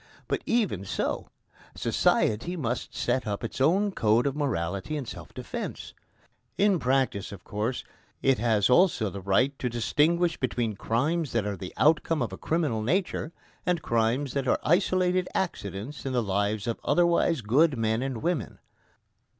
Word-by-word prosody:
But - - -1
even 215 - +1
so 95 - -2 0.5
society 115 +12 +1
must 120 -5 -3
set 125 -1 0
up 100 +1 -3
its 115 +3 -4
own 195 +8 +3
code 115 - +2
of 140 -1 0
morality 100 - -2
in 140 - -4
self - - -9
defence. - - -6 0.6
In 200 -3 +3
practice, 130 -7 0
of 100 -2 -10
course, 110 +5 -3 0.4
it 135 -3 +3
has 110 -3 +3
also 125 - +3
the 100 - -7
right 100 +9 +2
to 125 - -1
distinguish 160 +8 +1
between 120 -3 -1
crimes 145 - -1
that 115 -3 +1
are 105 -1 -2
the 90 0 -7
outcome 155 -1 +3
of 105 -5 -4
a - - -6
criminal 155 -9 0
nature, 165 - -1 0.3
and 180 -3 0
crimes 115 +4 +1
that 135 -2 -1
are - - +3
isolated 185 +1 +2
accidents 120 - -3
in 135 - -3
the 120 -2 +1
lives 100 +1 0
of 115 - -2
otherwise 170 -3 +2
good 135 +7 +3
men 110 +1 0
and 130 -2 -3
women. 165 - -1
125 Hz, 160 wpm, -27 LUFS, 110-160 Hz, 0.6 s, own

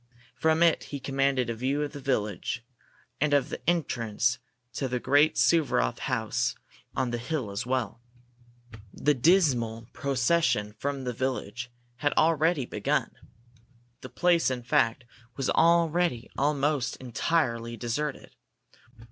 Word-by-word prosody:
From 160 +1 +2
it 170 -1 +3
he 140 - -6
commanded 135 -1 0
a 115 - -2
view 135 +6 -1
of 145 - -4
the 145 - -8
village, 120 -3 -2 0.6
and 150 -1 +3
of 140 -3 +1
the - - -6
entrance 120 -7 0 0.3
to 135 - -2
the 125 0 -2
great 145 +5 +3
Suvaroff 145 - +2
house - - -1 0.4
on 130 -2 0
the 120 - -2
hill 125 -4 -3
as 105 +5 -4
well. 125 -4 -2 0.9
The 150 - +1
dismal 125 - +2
procession 130 -5 +1
from 140 -1 -3
the 125 -1 -3
village 125 -1 -3 0.3
had 145 +4 0
already 160 -2 +2
begun. 105 -3 -1 0.9
The - - -8
place, 175 -4 +2
in 125 -2 -3
fact, 120 0 +1 0.3
was 135 - -1
already 170 -5 +2
almost 145 -1 0
entirely 120 -3 -1
deserted. 135 +6 -4
135 Hz, 130 wpm, -28 LUFS, 120-150 Hz, 0.9 s, it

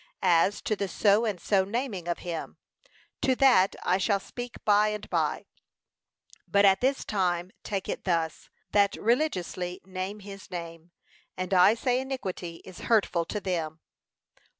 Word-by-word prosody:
As 180 +2 +3
to 215 - 0
the 200 -1 -2
so 205 +4 +3
and 205 -5 -2
so 195 +2 +2
naming 205 -3 -3
of 175 - -1
him, 170 -2 -5 0.6
to 260 - +2
that 245 -8 +5
I 185 +2 +2
shall 200 +1 +2
speak 245 +4 -8
by 210 0 +5
and 210 0 -4
by, - - 0 1.0
but 200 0 +4
at 195 -1 +5
this 270 +2 +1
time 180 -3 0
take 195 -2 -4
it - - -4
thus: 165 -3 -1 0.2
That 200 -1 +3
religiously 185 - -1
name 190 +2 -5
his 200 -2 -10
name. 170 -2 -7 0.5
And 185 +1 -3
I 190 +4 +6
say 250 +1 +1
iniquity 190 -10 -5
is 185 -2 -11
hurtful 195 -7 +3
to 210 - -3
them. 165 -5 -3
195 Hz, 150 wpm, -28 LUFS, 180-215 Hz, 1.0 s, I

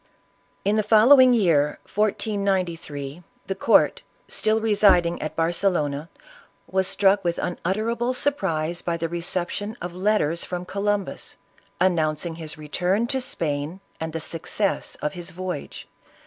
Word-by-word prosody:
In 205 +2 +2
the - - +4
following 245 +5 +7
year, 165 -11 +3
1493, 190 -8 -1 0.2
the 195 - -2
court, 195 +4 +3 0.4
then 220 0 +3
residing 200 -6 +3
at 155 0 -4
Barcelona, 165 -3 0 0.6
were 190 0 +1
struck 195 +1 +2
with 170 -1 0
unutterable 225 +8 -1
surprise 170 - -1
by 170 -1 -2
the 165 0 -2
reception 180 +5 -3
of 175 0 -5
letters 180 -4 +1
from 180 0 -5
Columbus, 200 +1 -2 0.4
announcing 165 -2 +1
his 160 -1 -7
return 180 +8 0
to 265 +2 -1
Spain, 155 -4 -2 0.2
and 160 0 -3
the 165 - -3
success 170 +5 -2
of 150 - -1
his 175 -1 -6
voyage. 185 -4 -6
180 Hz, 125 wpm, -24 LUFS, 165-205 Hz, 0.6 s, following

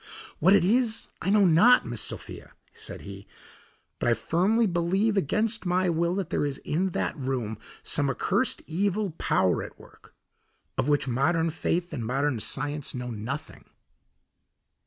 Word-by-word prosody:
"What 185 +6 +6
it 190 - +3
is 230 +2 +1
I - - -1
know 205 0 +5
not, 185 +9 +6
Miss 120 -2 -4
Sophia," - - -4 0.2
said - - -7
he, 100 0 -10 0.7
"but - - +1
I 120 - +4
firmly 190 - +1
believe, 190 +4 +1
against 215 +6 +1
my 180 0 +1
will, 170 +2 0
that 190 -4 -3
there - - 0
is 140 -2 -2
in 185 +5 0
that - - -1
room 130 -7 -3 0.2
some 145 -1 +2
accursed 200 - 0
evil 200 +3 -1
power 95 -2 +2
at - - -9
work, - - -18 0.6
of 140 - 0
which 145 -2 +2
modern 160 +6 +1
faith 175 +2 -2
and 120 - -3
modern 130 +2 0
science 145 +5 -2
know 125 -1 -5
nothing." 125 +8 -6
165 Hz, 155 wpm, -27 LUFS, 135-195 Hz, 0.7 s, What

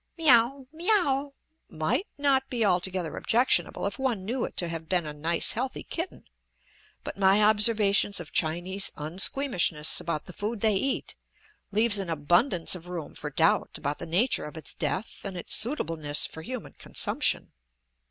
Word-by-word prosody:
"Me 325 -1 0
aow, 250 +3 +3
me 335 +5 -2
aow" 285 -9 +2 0.4
might 155 - -1
not 275 -2 +2
be 235 -3 0
altogether 180 -3 0
objectionable 245 -2 +1
if 200 +3 -4
one 240 -8 -1
knew 240 +4 -2
it - - -10
to 175 - +1
have 165 -1 -6
been 180 -3 +1
a 150 - -6
nice 160 +3 +1
healthy 255 +3 -3
kitten, 340 +3 -6 0.8
but - - -7
my 195 +2 +5
observations 210 -1 +4
of 170 - -9
Chinese 175 +5 0
unsqueamishness 170 - +1
about 155 -3 -4
the 180 - -10
food 210 +3 -4
they 220 -1 +3
eat 265 +8 -1 0.6
leaves 210 0 +3
an 190 -3 -4
abundance 170 - +2
of 180 -1 -7
room 175 -4 -6
for 150 - -6
doubt 160 +3 +1
about 145 0 -4
the 170 - -6
nature 195 +11 +2
of 150 +1 -9
its 160 - -7
death 175 +7 -3
and 195 -2 -5
its 175 - -3
suitableness 160 - 0
for 160 - -7
human 250 +5 -7
consumption. - - -1
195 Hz, 165 wpm, -27 LUFS, 165-240 Hz, 0.8 s, my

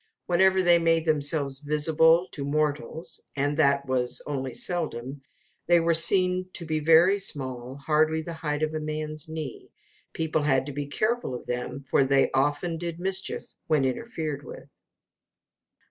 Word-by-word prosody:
Whenever 190 +1 +3
they 175 -1 +5
made 165 -1 +2
themselves 145 -3 0
visible 160 +3 +3
to 140 - -5
mortals 150 +3 -2
and 145 +1 0
that 140 -2 +3
was 125 -2 -1
only 135 -3 -3
seldom 135 -6 -3 0.5
they 175 0 +5
were 165 0 +2
seen 185 +2 +2
to 170 - -6
be 155 -1 -1
very 165 +6 +5
small, 130 -8 -4
hardly 155 +3 +1
the 170 - -6
height 150 -2 -3
of 155 0 -1
a 155 - -2
man's 155 0 -5
knee. 160 -2 -6 0.4
People 160 -1 -1
had 135 -3 +2
to 145 - -5
be 145 0 -4
careful 215 - -1
of - - -8
them, 125 +2 -4
for 135 - +2
they 135 0 +3
often 145 +5 0
did 170 -1 -4
mischief 190 +1 -3
when 150 -4 +2
interfered 155 - -3
with. - - -12
155 Hz, 155 wpm, -26 LUFS, 140-165 Hz, 0.5 s, they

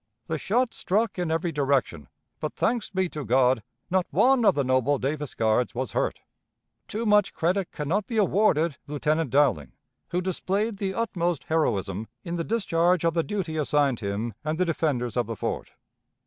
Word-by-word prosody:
The 160 -1 -3
shot 235 - +1
struck 210 +1 0
in 175 -2 -1
every 165 +1 0
direction, 135 - 0 0.3
but, - - -4
thanks 235 -2 0
be 190 -1 0
to 150 -3 -5
God! 125 0 +3 0.3
not 185 -1 +2
one 260 -1 +4
of 200 - +5
the 140 - +1
noble 130 +2 +2
Davis 145 +2 -3
Guards 110 +3 +1
was 125 -2 -2
hurt. - - -1 0.7
Too 220 +3 -3
much 210 -2 +3
credit 180 +3 0
can 150 - -5
not 195 +6 0
be 235 -3 -3
awarded 180 -6 +2
Lieutenant 150 +1 0
Dowling, 120 - +2 0.4
who 175 - 0
displayed 195 +4 -1
the 195 -1 -2
utmost 175 -8 -1
heroism 105 - 0 0.2
in 170 - -4
the 170 - -1
discharge 180 -5 +1
of 165 - +2
the 165 - +2
duty 175 -4 -3
assigned 145 -4 +2
him 105 +2 -3
and 155 +1 -2
the 185 - +2
defenders 145 -8 -1
of 120 -3 0
the 115 - -4
fort. - - -4
160 Hz, 175 wpm, -26 LUFS, 130-190 Hz, 0.7 s, of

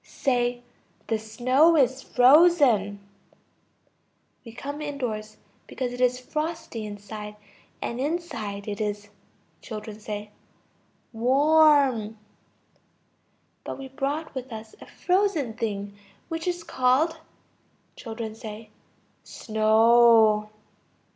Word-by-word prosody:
Say: 245 -2 -1 0.4
the 225 -1 -1
snow 255 +9 +3
is 260 -1 +2
frozen. 250 - +4 1.4
We 230 - -11
came 285 +5 -6
indoors, 230 -8 -5 0.3
because 250 -2 -4
it 245 - -6
is 250 0 +2
frosty 305 -7 -5
outside, 210 +1 -8 0.5
and 235 - -4
inside 260 - -4
it 205 0 -4
is... 205 -1 -3 0.5
Children. 210 -1 -7 0.8
Warm. 270 -2 +3 1.5
But - - -6
we 270 -1 -9
brought 285 +4 -3
with 260 -1 -7
us 220 0 -9
a - - -11
frozen 360 - 0
thing 205 -3 -4 0.3
which 325 +1 -4
is 350 -1 -2
called... 275 +5 +1 0.8
Children. 225 -2 -6 0.9
Snow. 220 -1 +4
245 Hz, 90 wpm, -25 LUFS, 215-285 Hz, 1.5 s, frozen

